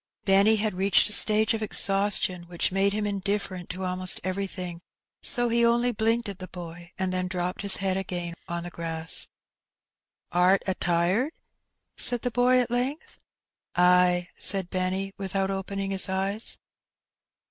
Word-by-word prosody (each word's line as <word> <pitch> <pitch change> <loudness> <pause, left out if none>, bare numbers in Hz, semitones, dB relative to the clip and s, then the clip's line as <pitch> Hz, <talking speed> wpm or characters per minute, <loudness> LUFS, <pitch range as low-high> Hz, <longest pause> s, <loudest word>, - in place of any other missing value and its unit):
Benny 200 +3 +4
had 215 -1 -1
reached 190 +2 +3
a - - -1
stage 215 +1 +3
of 225 - -3
exhaustion 195 -3 0
which 175 +1 -2
made 195 +1 +2
him 210 +1 -2
indiflFerent 200 -2 -3
to 185 +1 -5
almost 185 0 0
everything, 185 -2 -5 0.4
so 245 -2 +4
he 235 0 +1
only 240 +1 +2
blinked 225 +1 0
at 200 -1 -6
the 185 - -8
boy, 175 0 -10
and 185 -1 -2
then 185 0 0
dropped 180 0 -3
his 200 -1 +5
head 190 -1 -1
again 175 -3 -4
on 170 -1 -4
the 175 - -8
grass. 165 -1 +3 1.1
^^Art 180 +2 +4
a 190 - 0
tired 180 - 0 0.3
?'* - - -54
said 245 -2 +3
the 245 - -1
boy 250 +1 +3
at 245 - -3
length. 255 +5 -3 0.5
"Ay," 180 0 +3
said 190 -3 0
Benny, 190 +1 -2
without 195 0 -2
opening 195 0 -4
his 195 0 +3
eyes. 195 +3 -2
195 Hz, 160 wpm, -26 LUFS, 180-210 Hz, 1.1 s, his